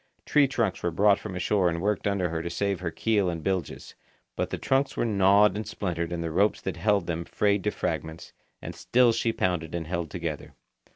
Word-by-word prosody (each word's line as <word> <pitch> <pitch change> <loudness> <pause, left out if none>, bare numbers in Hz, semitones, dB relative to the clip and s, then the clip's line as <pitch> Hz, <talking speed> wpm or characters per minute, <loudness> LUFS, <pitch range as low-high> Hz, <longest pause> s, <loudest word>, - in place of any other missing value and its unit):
Tree 145 -2 +4
trunks 115 -7 -1
were 90 - 0
brought 100 +4 +3
from 100 -4 -7
ashore 90 0 +1
and 85 0 -3
worked 105 +2 -1
under 100 -3 0
her 80 0 -3
to 85 - -4
save 100 +2 -1
her 90 -2 -3
keel 100 +1 +1
and 85 -2 -5
bilges, 95 -4 -3 0.4
but - - -2
the - - -3
trunks 135 +1 0
were - - +1
gnawed 100 -1 +4
and 105 +1 -4
splintered 85 -3 -3
and 85 -1 -3
the 80 - -3
ropes 100 +6 +2
that 95 -3 -5
held 100 0 +1
them 85 -1 -3
frayed 100 +2 0
to - - +3
fragments, 80 -4 -4 0.3
and - - -6
still 125 -1 +3
she 115 0 0
pounded 85 -6 -2
and 85 -1 -3
held 85 0 -3
together. - - -5
95 Hz, 215 wpm, -27 LUFS, 85-105 Hz, 0.4 s, Tree